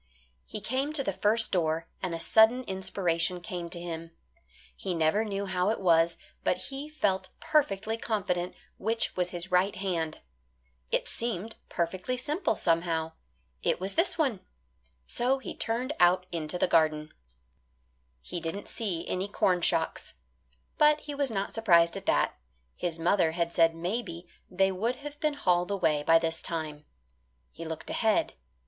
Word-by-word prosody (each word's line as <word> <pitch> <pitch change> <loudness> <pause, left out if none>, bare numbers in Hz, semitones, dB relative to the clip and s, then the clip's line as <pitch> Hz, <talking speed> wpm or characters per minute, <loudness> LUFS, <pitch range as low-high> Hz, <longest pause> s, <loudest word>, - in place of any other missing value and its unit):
He 215 - -6
came 265 +7 -1
to 285 -3 +2
the 195 - -1
first 210 +4 +2
door, 165 -2 0
and 180 -3 -2
a - - -5
sudden 220 +8 +5
inspiration 185 -3 0
came 175 -2 -5
to 170 - -6
him. 165 -1 -6 0.7
He 185 -3 -3
never 165 +6 +2
knew 200 -2 -3
how 185 0 0
it 225 - 0
was, 170 -2 +3 0.3
but - - +2
he 280 +2 -6
felt 190 -11 0
perfectly 225 -8 +1
confident 180 -6 -2 0.2
which 225 +3 0
was 180 -1 +1
his 175 +1 -3
right 185 +3 +3
hand. 170 -5 -2 0.7
It - - 0
seemed 225 -2 -2
perfectly 185 +8 -2
simple, 305 - 0
somehow. 165 -2 0 0.5
It - - +1
was 190 +2 +1
this 345 +2 +2
one. 265 - +1 0.7
So 250 - +1
he 265 - -7
turned 245 +5 -1
out 180 +1 +5
into 165 0 -3
the - - +2
garden. 155 -2 +2 1.1
He 175 - -5
didn't 165 +5 -5
see 190 -7 -3
any 185 +2 -1
corn 185 -3 +1
shocks. - - 0 0.6
But 300 0 +5
he 295 - -6
was 280 -1 +1
not 200 -3 -2
surprised 170 -7 +4
at - - -7
that. - - +2 0.4
His 170 -2 -2
mother 165 -1 +2
had 170 0 -1
said 165 -1 +4
maybe 175 -1 -4 0.2
they 190 +1 +2
would 225 +7 -1
have 290 +1 -9
been 305 -2 0
hauled 180 -8 +2
away 160 -7 +1
by 165 +2 +5
this 165 0 -1
time. 155 -3 -4 0.7
He 165 - -8
looked 160 0 -6
ahead. 220 -2 +2
185 Hz, 155 wpm, -29 LUFS, 170-225 Hz, 1.1 s, sudden